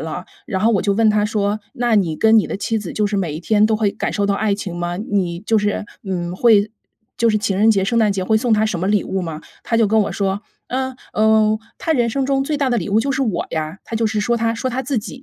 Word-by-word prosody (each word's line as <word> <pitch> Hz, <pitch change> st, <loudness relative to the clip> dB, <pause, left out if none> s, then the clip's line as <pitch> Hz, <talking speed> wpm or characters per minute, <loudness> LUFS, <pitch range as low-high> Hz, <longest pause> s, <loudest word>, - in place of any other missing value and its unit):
了， -, -, -5 dB, 0.2 s
然 195 Hz, -4 st, -2 dB
后 230 Hz, -, +4 dB
我 200 Hz, -, +2 dB
就 200 Hz, -2 st, +1 dB
问 220 Hz, 0 st, +4 dB
他 210 Hz, 0 st, +2 dB
说， 210 Hz, 0 st, -1 dB
“那 240 Hz, -2 st, +1 dB
你 170 Hz, -7 st, +1 dB
跟 220 Hz, 0 st, +5 dB
你 210 Hz, -, +1 dB
的 -, -, -4 dB
妻 220 Hz, +2 st, -1 dB
子 200 Hz, -5 st, -6 dB
就 210 Hz, -1 st, +1 dB
是 205 Hz, 0 st, -2 dB
每 165 Hz, -6 st, -2 dB
一 160 Hz, -, -5 dB
天 215 Hz, +3 st, +3 dB
都 220 Hz, -1 st, +1 dB
会 210 Hz, -2 st, +1 dB
感 -, -, -3 dB
受 205 Hz, -, 0 dB
到 200 Hz, -, +1 dB
爱 210 Hz, -1 st, +1 dB
情 195 Hz, -4 st, -6 dB
吗？ 175 Hz, 0 st, -3 dB
你 185 Hz, -4 st, -2 dB
就 220 Hz, +1 st, +1 dB
是， 205 Hz, 0 st, -1 dB, 0.2 s
嗯， 180 Hz, -2 st, -3 dB
会 215 Hz, -1 st, +4 dB, 0.5 s
就 235 Hz, -, +3 dB
是 215 Hz, -, +2 dB
情 205 Hz, -2 st, -1 dB
人 220 Hz, +2 st, +5 dB
节、 195 Hz, -3 st, +2 dB
圣 230 Hz, +3 st, +1 dB
诞 215 Hz, -2 st, +3 dB
节 190 Hz, -2 st, -2 dB
会 220 Hz, +3 st, +2 dB
送 230 Hz, 0 st, 0 dB
她 215 Hz, +1 st, +2 dB
什 180 Hz, -6 st, -2 dB
么 190 Hz, -, 0 dB
礼 205 Hz, 0 st, +2 dB
物 190 Hz, -, -2 dB
吗？” 160 Hz, -3 st, -5 dB, 0.2 s
他 230 Hz, -, -1 dB
就 225 Hz, -2 st, +4 dB
跟 220 Hz, +2 st, +3 dB
我 200 Hz, -, 0 dB
说： 195 Hz, 0 st, -1 dB, 0.3 s
“嗯 260 Hz, 0 st, -2 dB, 0.2 s
嗯， 215 Hz, 0 st, +3 dB, 0.2 s
她 325 Hz, -, -1 dB
人 240 Hz, -5 st, +2 dB
生 270 Hz, +4 st, -1 dB
中 270 Hz, 0 st, +1 dB
最 295 Hz, +2 st, -1 dB
大 275 Hz, -3 st, 0 dB
的 240 Hz, -, +2 dB
礼 170 Hz, -, -4 dB
物 205 Hz, +2 st, +3 dB
就 275 Hz, +4 st, 0 dB
是 275 Hz, -, -1 dB
我 210 Hz, -9 st, -1 dB
呀。” 160 Hz, +3 st, -3 dB
他 230 Hz, -, -7 dB
就 225 Hz, 0 st, +1 dB
是 215 Hz, -1 st, -1 dB
说 235 Hz, +2 st, +1 dB
他 230 Hz, 0 st, 0 dB
说 255 Hz, +2 st, -2 dB
他 260 Hz, +2 st, -2 dB
自 260 Hz, -2 st, -1 dB
己。 255 Hz, +5 st, -8 dB
215 Hz, 305 characters per minute, -19 LUFS, 195-230 Hz, 0.5 s, 跟